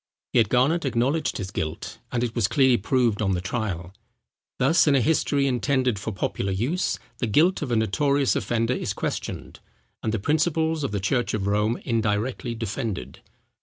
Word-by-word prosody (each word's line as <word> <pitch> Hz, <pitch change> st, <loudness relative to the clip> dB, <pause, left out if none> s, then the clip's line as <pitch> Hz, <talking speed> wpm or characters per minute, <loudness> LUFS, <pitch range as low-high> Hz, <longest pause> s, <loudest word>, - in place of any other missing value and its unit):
Yet 115 Hz, -4 st, +4 dB
Garnet 140 Hz, +8 st, +2 dB
acknowledged 135 Hz, +4 st, 0 dB
his 95 Hz, -2 st, -5 dB
guilt, 80 Hz, -3 st, -4 dB
and 120 Hz, 0 st, 0 dB
it 120 Hz, -2 st, -2 dB
was 115 Hz, -4 st, +1 dB
clearly 130 Hz, -2 st, +4 dB
proved 115 Hz, 0 st, +1 dB
on 95 Hz, -2 st, +1 dB
the -, -, -1 dB
trial. 95 Hz, -2 st, -3 dB, 0.6 s
Thus, 155 Hz, +6 st, +4 dB
in 145 Hz, -, +5 dB
a -, -, +5 dB
history 140 Hz, +1 st, +2 dB
intended 130 Hz, -3 st, +1 dB
for 110 Hz, -, -4 dB
popular 95 Hz, 0 st, -2 dB
use, 125 Hz, -, 0 dB, 0.2 s
the 120 Hz, -, 0 dB
guilt 165 Hz, -, +3 dB
of 145 Hz, -, -3 dB
a -, -, +2 dB
notorious 140 Hz, +6 st, +2 dB
offender 115 Hz, +1 st, 0 dB
is -, -, -2 dB
questioned, -, -, -5 dB, 0.4 s
and 110 Hz, -, -1 dB
the 115 Hz, -, 0 dB
principles 160 Hz, -, +1 dB
of -, -, 0 dB
the 100 Hz, -, -1 dB
church 120 Hz, +4 st, 0 dB
of 100 Hz, -3 st, -2 dB
Rome 105 Hz, +3 st, +1 dB
indirectly 115 Hz, +2 st, -1 dB
defended. 110 Hz, -, -4 dB
120 Hz, 170 wpm, -25 LUFS, 105-140 Hz, 0.6 s, in